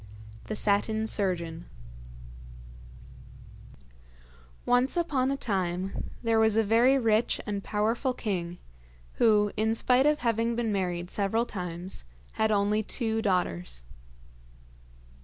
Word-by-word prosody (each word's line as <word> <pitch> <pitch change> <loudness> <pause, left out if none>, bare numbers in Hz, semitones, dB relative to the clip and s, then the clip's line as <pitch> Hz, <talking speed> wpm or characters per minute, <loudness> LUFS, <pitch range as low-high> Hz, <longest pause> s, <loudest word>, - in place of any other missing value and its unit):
THE 215 - -4
SATIN 215 +2 +1
SURGEON 170 -6 -2 3.0
Once 250 +6 +2
upon 280 -7 +1
a 275 - -1
time 190 -5 -2
there 225 -1 +2
was 220 -1 +3
a 225 - +4
very 235 +6 +4
rich 225 -2 +2
and 205 -2 -3
powerful 230 +5 0
king 175 -7 -3 0.6
who, 210 -3 +4
in 220 +1 +1
spite 255 +4 +3
of 300 0 +2
having 230 0 +1
been 230 -2 -1
married 180 -3 -2
several 215 +3 +1
times, 180 - -5 0.3
had 220 - 0
only 210 +1 +2
two 225 0 -1
daughters. 90 - -1
215 Hz, 110 wpm, -28 LUFS, 190-230 Hz, 3.0 s, a